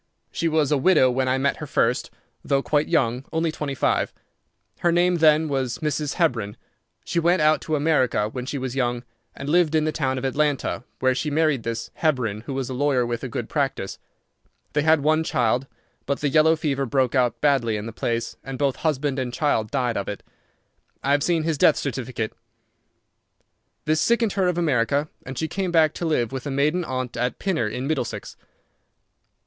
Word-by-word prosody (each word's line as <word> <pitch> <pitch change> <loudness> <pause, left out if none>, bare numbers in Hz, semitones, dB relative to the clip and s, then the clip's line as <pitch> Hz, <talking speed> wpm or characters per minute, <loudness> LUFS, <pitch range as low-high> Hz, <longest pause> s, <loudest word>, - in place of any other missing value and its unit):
She 170 - -1
was 155 -3 +1
a 145 - +3
widow 135 -5 +4
when 130 +1 0
I 130 +1 +2
met 140 +1 0
her 150 - -7
first, 125 -3 +1 0.3
though 135 -1 +1
quite 150 0 +1
young—only 155 +3 0
twenty 150 -3 -4
five. - - +1 0.7
Her 175 - +2
name 175 +1 +3
then 155 0 +4
was 130 -4 -1
Mrs. 150 -1 -2
Hebron. 120 - 0 0.5
She 170 - 0
went 175 +2 +3
out 155 0 +3
to 155 - -1
America 135 -8 +2
when 125 +3 -6
she 140 - -3
was 130 -1 -4
young, 120 -2 -1 0.3
and 140 - -7
lived 165 0 +3
in 155 - +3
the 155 - +1
town 130 -4 -1
of 130 - -3
Atlanta, 145 -1 0 0.2
where 130 0 +3
she 150 +4 -2
married 155 -3 +2
this 115 +1 -4
Hebron, 125 -10 0
who 135 - -3
was 135 -2 -2
a 130 - -5
lawyer 130 -1 +1
with 120 +1 -3
a - - -2
good 120 -1 -4
practice. 135 -9 -2 0.7
They 150 - +2
had 160 0 +4
one 155 +2 +2
child, 125 -2 0 0.4
but 140 0 -1
the 145 - 0
yellow 160 +3 +5
fever 140 -4 -1
broke 130 -1 +1
out 125 -4 +1
badly 135 -7 +2
in 105 - -5
the 115 - -6
place, 115 0 -2
and 135 -1 -6
both 140 -1 0
husband 145 -3 -1
and 125 -2 -2
child 120 -4 0
died 120 -1 -1
of 100 - -3
it. 105 - -6 0.8
I 140 - +1
have 145 0 +3
seen 165 +1 +1
his 160 -3 -1
death - - +5
certificate. 120 -4 -3 1.5
This 155 0 +2
sickened 235 0 +2
her 190 -2 +1
of 180 -1 0
America, 145 -2 +1 0.2
and 135 -1 -6
she 160 - -1
came 190 +1 -2
back 160 -2 +4
to 175 - -4
live 130 -8 0
with 135 +1 -5
a - - -2
maiden 150 +6 +1
aunt 130 -3 -4
at 125 0 -1
Pinner, 170 - 0
in 125 +5 -4
Middlesex. 155 -1 -3
140 Hz, 195 wpm, -24 LUFS, 125-155 Hz, 1.5 s, yellow